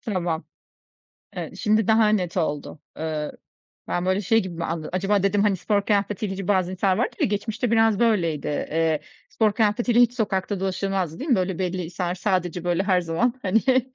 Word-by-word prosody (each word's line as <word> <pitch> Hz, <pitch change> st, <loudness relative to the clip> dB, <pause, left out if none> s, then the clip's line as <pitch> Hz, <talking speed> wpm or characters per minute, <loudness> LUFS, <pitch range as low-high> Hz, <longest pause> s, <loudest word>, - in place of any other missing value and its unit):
Tamam. 175 Hz, -, -2 dB, 0.9 s
Evet, -, -, -6 dB
şimdi 215 Hz, -1 st, +2 dB
daha 220 Hz, -1 st, +5 dB
net 185 Hz, -4 st, 0 dB
oldu. 150 Hz, -2 st, -2 dB, 0.2 s
Iıı, 155 Hz, -1 st, -3 dB, 0.6 s
ben, 175 Hz, +1 st, -1 dB
böyle, 190 Hz, +2 st, +1 dB
şey 225 Hz, +3 st, +3 dB
gibi 175 Hz, -3 st, -5 dB
anladım: 165 Hz, -1 st, -3 dB
Acaba 195 Hz, +1 st, +1 dB
dedim, 200 Hz, +1 st, +2 dB
hani, 205 Hz, -2 st, +3 dB
spor 200 Hz, +2 st, 0 dB
kıyafetiyle 205 Hz, -1 st, 0 dB
hiç 195 Hz, -1 st, -6 dB
Bazen 185 Hz, -3 st, +2 dB
insanlar 185 Hz, 0 st, +1 dB
vardır -, -, -1 dB
ya, -, -, +4 dB
geçmişte 220 Hz, +4 st, -2 dB
biraz 225 Hz, -2 st, +3 dB
böyleydi. 175 Hz, -11 st, +1 dB
Eee, 160 Hz, +1 st, 0 dB, 0.3 s
spor 215 Hz, -2 st, +1 dB
kıyafetiyle 235 Hz, +2 st, +2 dB
hiç 245 Hz, -1 st, +5 dB
sokakta 205 Hz, -4 st, -1 dB
dolaşılmazdı, 190 Hz, -3 st, -2 dB
değil 295 Hz, +4 st, -4 dB
mi? -, -, +6 dB
Böyle, 185 Hz, -1 st, -1 dB
belli 180 Hz, -1 st, -2 dB
insanlar 175 Hz, +1 st, -3 dB
sadece, 180 Hz, -3 st, -1 dB
böyle, 175 Hz, +2 st, +1 dB
her 185 Hz, -3 st, +2 dB
zaman, 175 Hz, +9 st, 0 dB
hani, 205 Hz, +3 st, +2 dB
he 260 Hz, -1 st, +4 dB
190 Hz, 180 wpm, -24 LUFS, 175-215 Hz, 0.9 s, mi